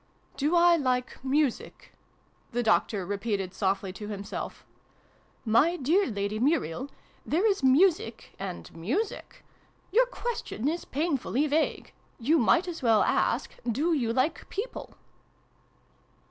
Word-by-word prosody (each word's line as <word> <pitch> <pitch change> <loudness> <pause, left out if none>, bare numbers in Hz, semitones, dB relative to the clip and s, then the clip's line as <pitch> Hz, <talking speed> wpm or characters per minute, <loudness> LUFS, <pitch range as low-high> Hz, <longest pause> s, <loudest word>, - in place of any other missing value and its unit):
" - - -35
Do 300 +5 +2
I 345 0 +6
like 255 -3 -1
Music? 275 -1 -1 0.3
" - - -37
the 240 +1 0
Doctor 215 -3 +1
repeated 200 -1 -2
softly 190 -1 -1
to 210 +2 -8
himself. 200 -1 -6 0.4
" - - -35
My 335 +3 +3
dear 340 +9 +2
Lady 205 -1 -2
Muriel, 265 - 0 0.3
there 345 +8 0
is 400 -3 +2
Music 265 - +2
and 190 -4 -7
Music. 255 - -3 0.5
Your - - +4
question 470 - -4
is 335 +3 -2
painfully 290 -2 0
vague. 305 +2 -1 0.2
You 300 +7 +2
might 335 - +3
as 345 -2 -5
well 225 -4 +4
ask - - +1
' 240 - -2
Do 305 +9 +1
you 240 -7 0
like 260 +7 -1
People 450 +5 -6
265 Hz, 135 wpm, -28 LUFS, 215-335 Hz, 0.5 s, I